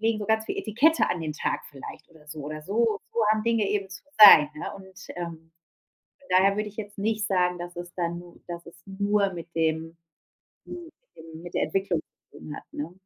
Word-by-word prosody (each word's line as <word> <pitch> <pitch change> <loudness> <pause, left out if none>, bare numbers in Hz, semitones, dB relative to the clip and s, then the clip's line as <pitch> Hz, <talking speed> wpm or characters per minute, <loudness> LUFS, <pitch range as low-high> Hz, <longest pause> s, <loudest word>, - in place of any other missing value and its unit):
legen 225 0 +1
so 205 - -5
ganz 220 0 +2
viel - - -3
Etikette 280 +10 +3
an 175 - -1
den 155 -1 -3
Tag - - -2
vielleicht 135 -2 -10
oder 155 -2 -20
so 155 0 -8
oder 155 +1 -6
so 215 +4 +1
so 235 - 0
haben 215 0 +2
Dinge 230 -3 +2
eben 200 -1 -1
zu 200 - -10 0.2
sein, 155 -8 +11
ne? 150 - -6
Und, 190 -1 -13
ähm, 165 -2 -7 0.7
von 280 - -22
daher 195 +1 +3
würde 210 0 -2
ich 205 - -19
jetzt 205 -1 -7
nicht 215 +1 -1
sagen, 180 -2 +1
dass 175 0 -7
es 175 0 -8
dann 170 -1 -2
nu 175 0 -15
dass 170 -1 -7
es 170 - -13
nur 200 0 +1
mit 170 0 -9
dem 160 0 -1 0.7
hm, 345 -2 -9 0.2
mit - - -46
dem 160 0 -11
mit 175 - -10
der - - +1
Entwicklung 190 -4 -1 0.3
zu - - -14
tun 150 - -8
hat, - - -10
ne? 155 +4 -5
185 Hz, 220 wpm, -26 LUFS, 165-210 Hz, 0.7 s, sein